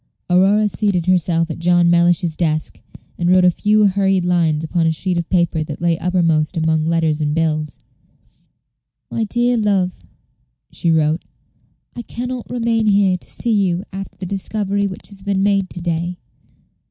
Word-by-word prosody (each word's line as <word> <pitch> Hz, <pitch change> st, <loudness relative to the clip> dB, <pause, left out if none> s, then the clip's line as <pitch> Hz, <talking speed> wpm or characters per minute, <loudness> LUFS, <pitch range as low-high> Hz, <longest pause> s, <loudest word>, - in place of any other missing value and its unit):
Aurora 195 Hz, +4 st, +4 dB
seated 185 Hz, -1 st, -1 dB
herself 170 Hz, -2 st, +1 dB
at -, -, -6 dB
John 175 Hz, 0 st, +3 dB
Mellish's 170 Hz, -1 st, +2 dB
desk, 155 Hz, -2 st, -2 dB, 0.4 s
and 175 Hz, 0 st, +1 dB
wrote 185 Hz, 0 st, +5 dB
a 180 Hz, -, +5 dB
few 210 Hz, +4 st, +2 dB
hurried 195 Hz, -2 st, +1 dB
lines 165 Hz, -3 st, +1 dB
upon 165 Hz, +1 st, 0 dB
a -, -, +2 dB
sheet 180 Hz, +3 st, -2 dB
of 170 Hz, 0 st, -3 dB
paper 170 Hz, -3 st, +1 dB
that 150 Hz, -1 st, -7 dB
lay 170 Hz, 0 st, +1 dB
uppermost 170 Hz, -2 st, +1 dB
among 160 Hz, -1 st, +1 dB
letters 160 Hz, -2 st, 0 dB
and 150 Hz, 0 st, 0 dB
bills. 155 Hz, -2 st, -1 dB, 1.3 s
"MY 225 Hz, -, -1 dB
DEAR 240 Hz, +2 st, +1 dB
LOVE," 195 Hz, -4 st, +1 dB, 0.8 s
she 170 Hz, -, -1 dB
wrote, 160 Hz, 0 st, +1 dB, 0.7 s
"I 240 Hz, -, -5 dB
can 245 Hz, +1 st, -6 dB
not 255 Hz, -2 st, -6 dB
remain 230 Hz, -2 st, 0 dB
here 200 Hz, -2 st, +3 dB
to 180 Hz, -, -8 dB
see 235 Hz, -, 0 dB
you 190 Hz, -3 st, +1 dB
after 195 Hz, 0 st, -7 dB
the 185 Hz, -, -5 dB
discovery 200 Hz, +1 st, -2 dB
which 185 Hz, -, -8 dB
has 200 Hz, -1 st, -10 dB
been 195 Hz, -1 st, -1 dB
made 195 Hz, -2 st, +1 dB
to 175 Hz, -, -8 dB
day. 170 Hz, +1 st, -2 dB
180 Hz, 165 wpm, -18 LUFS, 165-200 Hz, 1.3 s, wrote